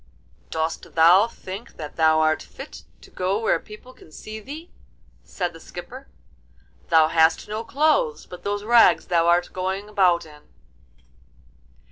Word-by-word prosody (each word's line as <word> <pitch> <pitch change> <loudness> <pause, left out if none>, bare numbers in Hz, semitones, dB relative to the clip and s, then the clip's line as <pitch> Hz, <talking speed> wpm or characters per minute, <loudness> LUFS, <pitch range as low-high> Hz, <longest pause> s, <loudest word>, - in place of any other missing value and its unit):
'Dost 160 0 -4
thou 175 +6 +6
think 200 -1 -10
that 150 -2 -8
thou 160 -1 +3
art 155 0 +2
fit - - -11 0.2
to - - -17
go 185 +2 -1
where 225 - +1
people 215 +4 -14
can 160 - -19
see 215 +7 -9
thee?' 300 - -10 0.5
said 180 -2 -4
the 165 - -12
skipper; 250 +12 -10 0.8
'thou 160 -2 +5
hast 160 0 +2
no 215 +2 -4
clothes 310 - +1
but 180 - -11
those 205 0 -3
rags 235 +1 +5
thou 170 -1 +1
art 175 +1 +2
going 190 +2 -3
about 185 -5 +2
in! 150 -1 -15
185 Hz, 145 wpm, -23 LUFS, 165-220 Hz, 0.8 s, thou